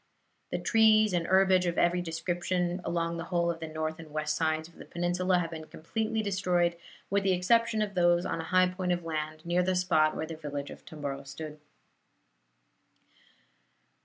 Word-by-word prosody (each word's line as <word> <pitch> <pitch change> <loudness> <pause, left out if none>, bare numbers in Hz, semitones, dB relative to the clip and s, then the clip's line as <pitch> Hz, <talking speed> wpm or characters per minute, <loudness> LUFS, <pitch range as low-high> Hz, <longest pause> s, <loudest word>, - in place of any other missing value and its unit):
The - - 0
trees 215 -2 +4
and 170 -1 0
herbage 190 -1 +4
of 170 - -1
every 175 +1 +3
description, 175 +2 -2
along 170 0 -1
the 165 - -5
whole 170 -1 +1
of 165 - -7
the 160 - -5
north 155 0 -4
and 160 -1 -10
west 155 0 -2
sides 160 0 0
of 170 - -20
the - - -10
peninsula, 180 +1 0
have 170 -1 -2
been 160 -1 -7
completely 220 +8 -3
destroyed, 180 -4 +1 0.4
with 200 0 +3
the 195 -1 +2
exception 220 +4 +2
of 205 -1 -4
those 175 -1 +3
on 165 - -2
a - - -7
high 185 +1 +4
point 180 -1 -1
of 175 -1 -3
land, 155 0 -4
near 175 +1 +2
the 185 +1 +1
spot 160 -4 +3
where 155 - -2
the 165 - -7
village 145 -2 -5
of - - -11
Tomboro 140 -4 -5
stood." 150 +2 -8
175 Hz, 185 wpm, -29 LUFS, 160-185 Hz, 0.4 s, trees